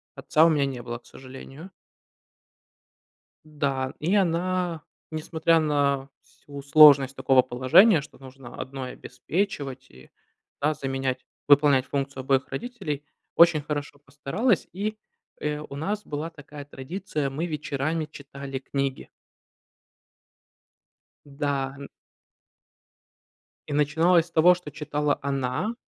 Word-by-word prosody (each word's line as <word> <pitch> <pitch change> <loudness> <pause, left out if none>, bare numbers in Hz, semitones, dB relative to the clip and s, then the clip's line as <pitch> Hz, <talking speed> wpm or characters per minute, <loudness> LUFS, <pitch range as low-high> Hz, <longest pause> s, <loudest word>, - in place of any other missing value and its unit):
Отца 155 +1 +3
у 165 - +5
меня 145 -3 +2
не 130 -3 -5
было, 120 0 -5
к - - -34
сожалению. 135 +6 -11 1.7
Да, 140 -3 -2
и 175 +6 +1
она, 180 -2 0 0.3
несмотря 160 +1 +1
на 140 -3 0
всю 145 -1 -12
сложность 140 -2 +7
такого 135 -2 +4
положения, 130 - +5
что 145 - -14
нужно 130 -2 -12
одной 130 -1 -6
обеспечивать, 145 -8 -4
и, 65 +1 -17 0.5
да, 150 +2 +2
заменять 135 -2 -3 0.2
выполнять 145 -2 +5
функцию 140 -1 -3
обоих 135 0 +1
родителей, 155 - -5 0.3
очень 170 -2 +6
хорошо 145 -1 -5
постаралась 145 - -1
и, 210 +4 -3 0.4
э, 150 0 -1
у 145 -2 -9
нас 200 +8 -3
была 150 +2 -4
такая 145 -2 -11
традиция: 145 +2 -4
мы 150 +6 -3
вечерами 155 0 -2
читали 140 -2 -8
книги. 135 0 -3 2.2
Да, 140 -1 -2
м. 140 0 -9 1.8
И 145 - -4
начиналось 160 +4 +3
с - - -23
того, 165 +3 +6
что 180 -4 -10
читала 150 0 -1
она, 135 - -2
145 Hz, 115 wpm, -25 LUFS, 135-160 Hz, 2.2 s, сложность